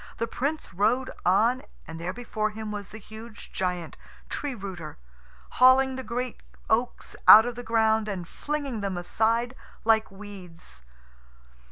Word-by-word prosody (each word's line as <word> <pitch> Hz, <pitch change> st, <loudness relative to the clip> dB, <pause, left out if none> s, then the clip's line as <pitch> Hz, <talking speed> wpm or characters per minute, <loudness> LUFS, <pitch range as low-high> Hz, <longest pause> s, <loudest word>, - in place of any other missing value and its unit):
The 230 Hz, -, 0 dB
Prince 280 Hz, -, -3 dB
rode 230 Hz, +8 st, +1 dB, 0.2 s
on, 230 Hz, +8 st, +4 dB, 0.3 s
and 165 Hz, 0 st, -7 dB
there 175 Hz, +2 st, -3 dB
before 215 Hz, -1 st, -2 dB
him 215 Hz, 0 st, -6 dB
was 205 Hz, -1 st, -6 dB
the 215 Hz, -, -9 dB
huge 220 Hz, +1 st, -11 dB
giant, 180 Hz, -3 st, -3 dB, 0.3 s
Tree 285 Hz, -3 st, -3 dB
rooter, 190 Hz, -7 st, -7 dB, 0.6 s
hauling 260 Hz, +1 st, +6 dB
the 260 Hz, -, -4 dB
great 245 Hz, +2 st, -4 dB, 0.3 s
oaks -, -, 0 dB
out 220 Hz, +2 st, +11 dB
of 245 Hz, -, -2 dB
the 245 Hz, -, -7 dB
ground 220 Hz, -2 st, +2 dB
and 185 Hz, -5 st, -4 dB
flinging 285 Hz, -5 st, -4 dB
them 195 Hz, -2 st, -2 dB
aside 230 Hz, +7 st, 0 dB, 0.3 s
like 220 Hz, -1 st, +4 dB
weeds. 195 Hz, -4 st, -11 dB
220 Hz, 145 wpm, -27 LUFS, 195-245 Hz, 0.6 s, out